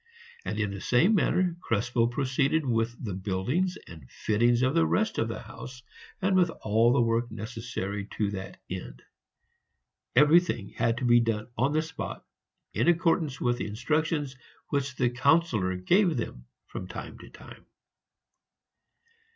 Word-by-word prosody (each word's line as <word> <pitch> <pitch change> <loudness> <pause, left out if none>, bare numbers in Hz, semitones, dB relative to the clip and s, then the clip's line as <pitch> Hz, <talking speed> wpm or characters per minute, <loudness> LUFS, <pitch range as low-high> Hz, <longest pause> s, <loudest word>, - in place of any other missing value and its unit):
And - - -3
in 105 -2 0
the 100 -1 -6
same 165 - +3
manner 185 -3 +2
Krespel 120 - +1
proceeded 140 +4 0
with 115 -1 0
the 100 - -3
buildings 105 - -1
and 80 -7 -13
fittings 120 +3 +1
of 130 +1 +2
the 165 0 +4
rest 220 0 0
of 115 - +1
the 115 - -4
house, 125 +2 -10 0.4
and 190 0 +3
with 180 -2 +4
all 115 -4 +2
the 125 0 +3
work 115 +1 +1
necessary 110 -3 -5
to 105 -2 0
that 95 -1 -7
end; - - -7 1.1
everything 150 - +4
had 115 0 0
to 125 - -2
be 120 0 +6
done 115 -1 -1
on 135 +4 +1
the 155 +1 +2
spot 160 0 -7 0.5
in - - +1
accordance 165 -5 +2
with 120 0 0
the - - -2
instructions 145 +5 -1 0.3
which 140 -2 -1
the 125 -2 +1
Councillor 125 - +2
gave 175 - +2 0.5
from - - -7
time - - -8
to - - -12
time. - - -14
120 Hz, 150 wpm, -28 LUFS, 110-155 Hz, 1.1 s, be